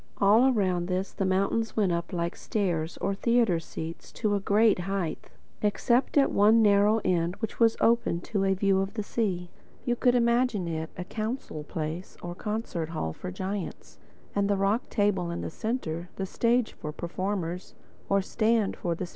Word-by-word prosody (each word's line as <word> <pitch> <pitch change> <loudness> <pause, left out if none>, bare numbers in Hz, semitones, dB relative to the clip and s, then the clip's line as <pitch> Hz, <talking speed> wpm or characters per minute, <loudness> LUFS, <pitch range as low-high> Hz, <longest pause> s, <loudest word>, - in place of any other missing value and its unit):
All 215 +6 +5
around 185 -6 +1
this 185 +1 -1
the 195 - -1
mountains 200 +5 0
went 200 -4 +3
up 170 0 -2
like 170 -1 -2
stairs, 175 -6 -2
or 195 +2 -1
theatre 230 -4 +2
seats, 165 0 -7
to 215 -2 0
a 200 - +2
great 210 +1 +3
height—except 200 - -1
at 275 - +5
one 220 +3 +5
narrow 205 +1 +4
end 175 0 +1
which 220 0 -5
was 225 -1 +4
open 230 -7 +2
to 200 +1 -1
a 195 0 +2
view 195 0 +2
of 195 +3 -4
the 215 - -2
sea. 185 -6 -2 0.3
You 240 - +1
could 245 0 +3
imagine 235 -5 +2
it 160 -1 -3
a 180 - -3
council 215 - -4
place 160 +4 -5
or 175 0 -4
concert 210 -5 -3
hall 80 - -3
for - - -7
giants, 190 - -5 0.3
and 200 0 +1
the 200 - +2
rock 200 +5 +1
table 200 -5 +1
in 170 - -3
the - - -4
centre 180 -6 -3
the 195 - -3
stage 235 +4 +1
for 150 - -6
performers 180 +1 -4 0.3
or 200 0 +3
the - - -11
stand 220 -2 +1
for 170 -1 -1
the 180 - -4
speaker. - - -12
195 Hz, 180 wpm, -28 LUFS, 175-220 Hz, 0.3 s, All